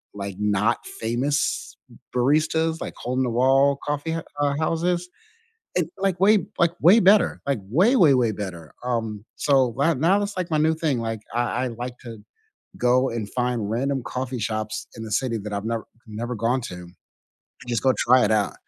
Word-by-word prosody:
like 100 -1 -5
not 105 0 +1
famous 130 +6 -2 0.4
baristas, 155 +5 +1
like, - - -5
hole 125 +1 -4
in 130 - +2
the 125 - 0
wall 135 +3 +3
coffee 145 +2 -2
hou 145 -3 -2
houses, 175 +2 0 0.7
and, - - +1
like, 190 -2 0
way, 210 +2 +6 0.2
like, 170 -1 +4
way 195 +7 +7
better, 200 +2 +4
like, 140 -3 0
way 180 - +3
way 155 - +6
way 120 -4 +2
better, 85 -7 -7
um, 115 -4 -2
so, 135 -4 +2
right 145 +2 +2
now 185 +7 +3
it's, 205 0 -4
like, 180 -1 -3
my 155 - +1
new 160 +1 +3
thing, 155 -6 -1
like, 115 -2 -3
I 120 +1 0
I - - -1
like 120 +1 -6
to 115 -2 -8 0.6
go 125 +2 +3
and 110 -3 -4
find 120 -4 -1
random 135 +3 -1
coffee 130 0 -4
shops 110 0 -3
in 115 - -6
the 110 - -8
city 115 +1 0
that 105 +1 -6
I've 100 +1 -3
never 115 -1 -2 0.2
never 115 +3 -4
gone 120 +4 0
to, 90 - -7
and 90 0 -11 0.7
just 120 -3 -1
go 130 -1 +4
try 125 +1 +4
it 105 - 0
out. 105 -2 +1
125 Hz, 185 wpm, -24 LUFS, 115-155 Hz, 0.7 s, way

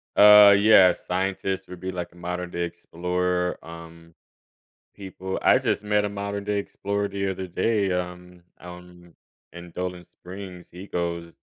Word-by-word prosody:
Uh, 105 -1 +9
yeah, 100 -3 +7
scientists 95 +1 -3
would 90 -1 -10
be 95 +1 -4
like 90 -1 -6
a - - -22
modern-day 90 0 -4
explorer, 90 +1 -2
um, 85 0 -13 0.8
people 95 -1 -6
I - - +5
just - - -1
met 105 0 +1
a - - -2
modern-day 100 0 -3
explorer 100 0 -3
the 100 0 -3
other 95 0 -5
day, 100 +1 0
um, 90 0 -5 0.2
out 90 0 -10
in 90 -1 -18 0.4
in 85 0 -11
Dolan 90 0 -5
Springs. 90 -1 -11
He 90 +3 -11
goes 85 -1 -4
90 Hz, 145 wpm, -24 LUFS, 90-100 Hz, 0.8 s, Uh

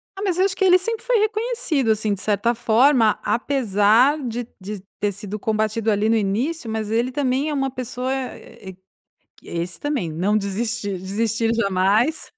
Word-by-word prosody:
Ah, 390 - -7
mas 370 -4 0
eu 375 - +4
acho 375 - -1
que 385 - +1
ele 365 0 +7
sempre 455 +5 -2
foi - - +3
reconhecido, 430 - 0
assim, 215 -1 0
de 190 - -4
certa 215 +3 +1
forma 235 0 +3
apesar 235 +1 +3
de 235 +1 -4
de 200 +2 -6 0.2
ter 205 -1 0
sido 205 +1 -6
combatido 220 +1 -1
ali 210 +1 +1
no 230 - +3
início, 230 +7 -1
mas 220 -1 -3
ele 235 +3 +1
também 270 +2 0
é - - -2
uma 270 -2 -1
pessoa 255 0 -4
e 250 -7 -7 0.7
esse 170 0 -5
também 275 - -2
"Não 190 +7 +1
desistir, 205 0 -2
desistir 225 +4 -1
jamais". 210 +6 +1
230 Hz, 170 wpm, -22 LUFS, 205-275 Hz, 0.7 s, ele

